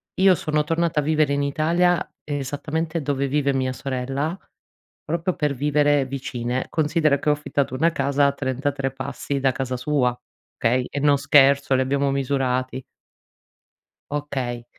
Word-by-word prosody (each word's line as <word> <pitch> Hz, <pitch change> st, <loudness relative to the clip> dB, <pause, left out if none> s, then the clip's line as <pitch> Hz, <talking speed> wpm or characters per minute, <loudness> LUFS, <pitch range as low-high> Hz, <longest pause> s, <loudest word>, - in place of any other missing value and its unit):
Io 190 Hz, 0 st, +5 dB
sono 150 Hz, -2 st, -1 dB
tornata 165 Hz, -1 st, 0 dB
a -, -, 0 dB
vivere 155 Hz, -1 st, +2 dB
in 140 Hz, -, +1 dB
Italia 170 Hz, +4 st, +2 dB, 0.2 s
esattamente 150 Hz, +3 st, -3 dB
dove 140 Hz, -1 st, -1 dB
vive 140 Hz, 0 st, +1 dB
mia 130 Hz, -1 st, 0 dB
sorella 135 Hz, +6 st, -3 dB, 0.7 s
proprio 170 Hz, +3 st, -1 dB
per 150 Hz, -2 st, 0 dB
vivere 145 Hz, 0 st, +2 dB
vicine. 125 Hz, -2 st, -3 dB
Considera 155 Hz, -2 st, +2 dB
che 150 Hz, -, -1 dB
ho 150 Hz, -, +5 dB
affittato 145 Hz, -2 st, -2 dB
una 165 Hz, +6 st, +2 dB
casa 140 Hz, 0 st, +2 dB
a 140 Hz, -, +2 dB
33 135 Hz, 0 st, -2 dB
passi 140 Hz, +1 st, -4 dB
da 135 Hz, -1 st, +2 dB
casa 130 Hz, -1 st, -3 dB
sua. 125 Hz, -2 st, +1 dB, 0.4 s
Okay? 125 Hz, +2 st, +1 dB
E 145 Hz, -, -3 dB
non 145 Hz, 0 st, +4 dB
scherzo 140 Hz, -1 st, +4 dB
li 130 Hz, -, +2 dB
abbiamo 140 Hz, +1 st, +1 dB
misurati. 130 Hz, -1 st, -1 dB, 1.3 s
Okay. 130 Hz, -5 st, -3 dB
140 Hz, 145 wpm, -23 LUFS, 130-150 Hz, 1.3 s, Io